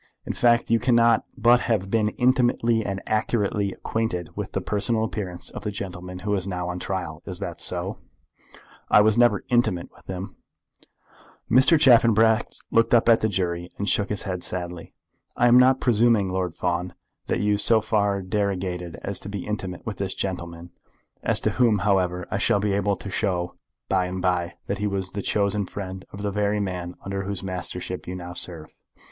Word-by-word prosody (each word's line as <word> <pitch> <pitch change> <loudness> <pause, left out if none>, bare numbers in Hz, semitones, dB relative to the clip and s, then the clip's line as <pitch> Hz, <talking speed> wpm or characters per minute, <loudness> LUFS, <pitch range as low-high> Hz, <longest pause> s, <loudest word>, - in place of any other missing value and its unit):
"In - - -3
fact 120 -1 +2
you 115 - +4
cannot 115 -2 +3
but 120 +1 +5
have 100 -6 -1
been 110 -2 +2
intimately 120 -2 +2
and 95 -1 -4
accurately 105 -2 0
acquainted 95 -5 -3
with - - -5
the - - 0
personal 110 +2 0
appearance 95 -5 -4
of - - -8
the 105 - -2
gentleman 90 -2 -6
who 105 - 0
is 95 -1 -1
now 90 -2 -3
on 90 0 -4
his - - -6
trial. 85 -5 -4
Is - - -5
that - - -6
so?" - - 0 0.9
"I - - +7
never 110 +1 +4
was - - -6
intimate 120 -8 +1
with - - -21
him." 95 +1 -6 1.1
Mr. 130 +6 +6
Chaffanbrass 115 -4 +4
looked 115 +1 +4
up 115 - +3
at 115 - +6
the 110 - +1
jury 85 -2 -2
and 100 - -3
shook 100 0 +2
his 105 - -2
head 90 -2 -4
sadly. 90 -2 -4 0.4
"I 120 - +4
am 120 +1 +7
not 130 +1 +5
presuming, 115 -4 +3
Lord 90 -3 -2
Fawn, 90 0 -2 0.3
that - - 0
you 105 0 +2
so 115 +1 +6
far 100 -2 0
derogated 95 -3 -2
as 100 - 0
to 100 - -7
be 100 -2 -5
intimate 95 -4 -5
with 110 - -5
this 95 -1 -2
gentleman, 85 -2 -5 0.5
as - - +2
to - - +1
whom, 120 -4 +3
however, 90 -3 0
I 100 - -1
shall 100 - +2
be 100 0 0
able 100 0 +1
to 100 +1 -8
show 90 -3 -1 0.3
by 95 -1 +1
and 95 +1 -4
by 90 -2 0
that 100 0 -3
he 105 - 0
was 95 -2 -3
the 100 - -4
chosen 100 0 0
friend 95 -1 -7
of 100 +1 -8
the 100 - -1
very 105 +1 0
man 90 -3 -4
under 100 0 -3
whose 95 -1 -4
mastership 90 -1 -5
you 90 - -4
now 90 -1 -7
serve. 85 -3 -5
100 Hz, 190 wpm, -24 LUFS, 90-110 Hz, 1.1 s, I